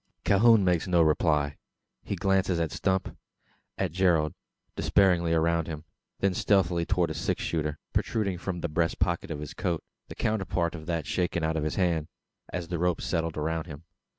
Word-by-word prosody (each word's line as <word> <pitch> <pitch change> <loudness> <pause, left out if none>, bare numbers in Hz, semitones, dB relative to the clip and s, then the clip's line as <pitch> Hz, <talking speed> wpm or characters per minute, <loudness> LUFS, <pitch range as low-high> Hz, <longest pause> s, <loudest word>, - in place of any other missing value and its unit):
Calhoun 110 0 +5
makes 90 0 +2
no 85 -2 +4
reply. 75 -2 +2 0.4
He - - -4
glances 95 -1 +1
at 80 -2 -1
Stump 95 -1 -1 0.6
at - - -1
Gerald 85 -4 +2 0.4
despairingly 90 -4 +3
around 85 0 +2
him; 80 -2 -6 0.4
then 100 -1 +2
stealthily 90 -3 +2
towards 90 -4 +1
a - - -2
six 75 - -2
shooter, 75 -2 -1 0.2
protruding 100 -6 0
from 90 -1 -4
the 85 - -1
breast 85 +1 0
pocket 85 -1 0
of 80 -3 -4
his 75 -1 -7
coat 90 -4 -2 0.2
the - - -9
counterpart 95 -5 -1
of 80 -3 -8
that 85 -4 -1
shaken 85 +1 -1
out 80 0 0
of 80 - -1
his 75 - -2
hand, 85 -5 +1 0.4
as 85 -2 -4
the 85 -2 -2
rope 90 -1 +1
settled 80 -2 -2
around 80 +2 -2
him. 75 -1 -9
85 Hz, 180 wpm, -28 LUFS, 80-90 Hz, 0.6 s, Calhoun